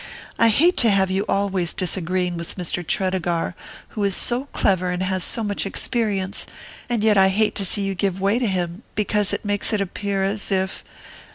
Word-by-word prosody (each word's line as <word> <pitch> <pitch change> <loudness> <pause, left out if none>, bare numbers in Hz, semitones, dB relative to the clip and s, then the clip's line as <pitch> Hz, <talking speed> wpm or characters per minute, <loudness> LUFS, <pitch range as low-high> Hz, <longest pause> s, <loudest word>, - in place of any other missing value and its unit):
I 230 - +6
hate 335 - +4
to 235 - +5
have 190 -2 +2
you 195 +2 0
always 195 -3 0
disagreeing 180 0 -1
with 170 0 -5
Mr. 175 -1 -1
Tredegar, 180 -2 -1 0.4
who 210 - -4
is 200 -2 +1
so 250 +3 +1
clever 185 -9 +1
and 180 +1 -1
has 185 -1 0
so 230 - 0
much 205 -1 -1
experience; 200 -1 -2 0.4
and 235 -3 0
yet 210 -2 +5
I 190 - +6
hate 210 +3 +2
to - - -2
see 205 - 0
you 195 0 -1
give 190 0 -1
way 200 +5 +2
to 245 - +1
him, 180 -1 -2
because 210 -1 +1
that - - -3
makes 205 +2 -1
it 215 - +2
appear 200 0 -2
as 200 +1 -2
if... 190 0 -1
195 Hz, 195 wpm, -22 LUFS, 185-210 Hz, 0.4 s, I